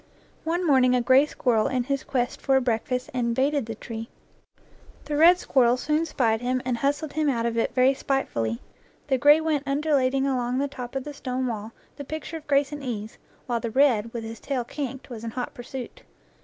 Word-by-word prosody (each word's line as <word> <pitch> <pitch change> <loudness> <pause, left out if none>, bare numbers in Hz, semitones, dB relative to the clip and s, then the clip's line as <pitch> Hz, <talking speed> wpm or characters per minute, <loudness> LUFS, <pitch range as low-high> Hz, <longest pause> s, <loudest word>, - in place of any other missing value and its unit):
One 345 +2 0
morning 255 -4 +4
a 250 - +2
gray 260 +4 +5
squirrel 230 -7 +1
in 255 -2 0
his 275 +1 -2
quest 245 -2 -2
for 270 - +2
a 265 - +4
break 230 -3 -1
fast 250 0 -2
invaded 260 +2 0
the 225 - -5
tree. 225 +1 -7 1.0
The 295 - -3
red 335 +4 +7
squirrel 250 -7 +3
soon 305 +5 0
spied 225 -7 +1
him 255 +1 0
and 250 -2 0
hustled 285 +3 -1
him 310 -1 +1
out 235 -3 0
of 235 -1 -1
it 230 +1 0
very 255 +1 +5
spitefully. 115 - -2 0.5
The 265 -2 +2
gray 295 +4 +7
went 305 -3 -1
undulating 275 -2 +1
along 250 -2 0
the 280 +1 +1
top 250 -2 -8
of 270 - -2
the 295 - -7
stone 255 -2 -3
wall, 220 -2 -4 0.3
the 285 - -6
picture 315 +3 -6
of 310 - -14
grace 280 -1 +2
and 295 -1 -6
ease, 220 -5 -5 0.3
while 240 -2 -1
the 230 - -3
red, 230 -3 +3
with 225 -1 -6
tail 265 -4 -2
kinked, 265 +1 -6
was 230 -2 -7
in 230 - -3
hot 245 +2 -5
pursuit. 255 - -8
260 Hz, 205 wpm, -25 LUFS, 240-285 Hz, 1.0 s, red